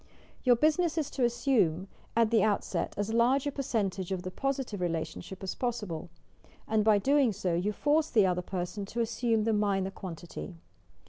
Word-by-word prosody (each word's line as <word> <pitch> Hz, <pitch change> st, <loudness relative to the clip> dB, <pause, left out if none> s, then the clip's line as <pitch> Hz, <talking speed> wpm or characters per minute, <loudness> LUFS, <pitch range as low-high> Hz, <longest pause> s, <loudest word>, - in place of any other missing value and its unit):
Your 250 Hz, -2 st, +6 dB
business 315 Hz, +5 st, +2 dB
is 305 Hz, -4 st, -1 dB
to 260 Hz, -, -1 dB
assume 235 Hz, -, +2 dB, 0.3 s
at 230 Hz, -1 st, +3 dB
the 230 Hz, -, +4 dB
outset 210 Hz, -2 st, 0 dB
as 205 Hz, +2 st, -1 dB
large 250 Hz, +4 st, +3 dB
a 285 Hz, -, 0 dB
percentage 200 Hz, -9 st, -2 dB
of 185 Hz, -2 st, -2 dB
the 185 Hz, -, -5 dB
positive 265 Hz, -5 st, -2 dB
relation 165 Hz, -2 st, -2 dB
ship 190 Hz, +2 st, -10 dB
as 190 Hz, -, -2 dB
possible, 210 Hz, -10 st, -3 dB, 0.6 s
and 220 Hz, -1 st, +2 dB
by 215 Hz, -1 st, +5 dB
doing 270 Hz, +3 st, +3 dB
so, 190 Hz, -3 st, -2 dB
you 180 Hz, +5 st, 0 dB
force 295 Hz, +8 st, +1 dB
the 215 Hz, -5 st, +4 dB
other 180 Hz, -1 st, +1 dB
person 180 Hz, +2 st, -4 dB
to 235 Hz, +3 st, -2 dB
assume 225 Hz, -1 st, +1 dB
the 225 Hz, 0 st, +1 dB
minor 200 Hz, -2 st, +1 dB
quantity. 165 Hz, -, -8 dB
215 Hz, 180 wpm, -30 LUFS, 185-245 Hz, 0.6 s, Your